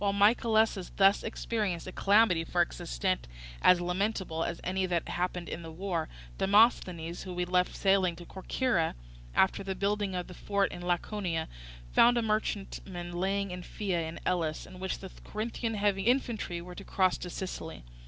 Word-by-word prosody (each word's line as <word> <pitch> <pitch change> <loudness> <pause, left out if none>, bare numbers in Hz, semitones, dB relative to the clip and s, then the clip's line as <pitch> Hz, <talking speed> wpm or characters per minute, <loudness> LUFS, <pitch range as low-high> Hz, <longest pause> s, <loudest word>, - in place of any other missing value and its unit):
While 200 -1 +2
Mycalessus 220 -1 +3
thus 195 +1 +5
experienced 210 -6 -2
a 185 - -6
calamity 200 -4 +4
for 175 +1 +2
its - - -8
extent - - -1 0.3
as 180 -1 +6
lamentable 180 -2 -1
as 170 - -3
any 185 +1 0
that 175 -2 -1
happened 180 -1 -2
in - - -5
the 165 - -8
war, 170 -1 -3 0.3
Demosthenes, 190 -5 +3
whom 185 -2 -6
we 180 0 0
left 180 0 +1
sailing 190 -3 +3
to 175 - -11
Corcyra, 190 -1 0 0.4
after 190 +1 +3
the 195 -1 -3
building 200 0 0
of 180 -1 -2
the 180 - -10
fort 200 +1 0
in 175 - -7
Laconia, 175 -1 -1 0.4
found 240 +1 +6
a 235 - +2
merchantman 195 -4 -2
lying 190 +2 -1
at 180 0 -6
Phea 175 -4 -2
in 160 - -7
Elis, 160 -4 0
in 185 - -12
which 190 0 -2
the 190 -1 -9
Corinthian 225 +1 -3
heavy 200 -1 +1
infantry 220 -7 0
were 180 0 -9
to 200 - -9
cross 185 -2 +1
to 180 - -5
Sicily. 180 - -6
185 Hz, 175 wpm, -30 LUFS, 175-205 Hz, 0.4 s, as